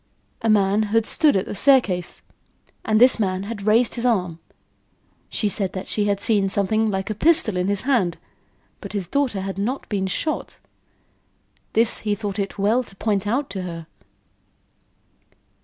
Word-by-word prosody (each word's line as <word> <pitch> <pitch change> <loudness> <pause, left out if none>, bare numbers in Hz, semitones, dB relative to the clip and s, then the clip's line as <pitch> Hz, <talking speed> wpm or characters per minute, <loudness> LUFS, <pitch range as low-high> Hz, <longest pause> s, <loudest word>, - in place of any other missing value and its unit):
A 225 - 0
man 205 0 +3
had 225 +1 +2
stood 300 0 +2
at 190 - +1
the - - -6
staircase, 205 -7 +2 0.6
and 215 0 +2
this 250 0 +5
man 190 -2 -1
had 205 -1 -6
raised 230 +3 +3
his 235 - -4
arm. 180 -9 0 0.9
She 210 - -1
said 195 -2 -2
that 185 - -6
she 210 - 0
had 200 -1 0
seen 200 -2 +1
something 215 +3 +1
like 190 +1 -2
a - - 0
pistol 265 - +2
in 180 +1 0
his 200 -1 0
hand, 230 -11 +1 0.6
but - - -9
his 195 -4 -3
daughter 250 -3 -1
had 195 0 -5
not 245 +7 -3
been 195 -3 -1
shot. 305 +11 -3 1.2
This 230 +1 +3
he 210 -1 -1
thought 205 -1 -5
it 195 0 -3
well 210 +5 +2
to 210 -5 -13
point 205 -1 -1
out 265 +6 0
to 195 -1 -4
her. 170 -2 -6
205 Hz, 170 wpm, -22 LUFS, 195-230 Hz, 1.2 s, this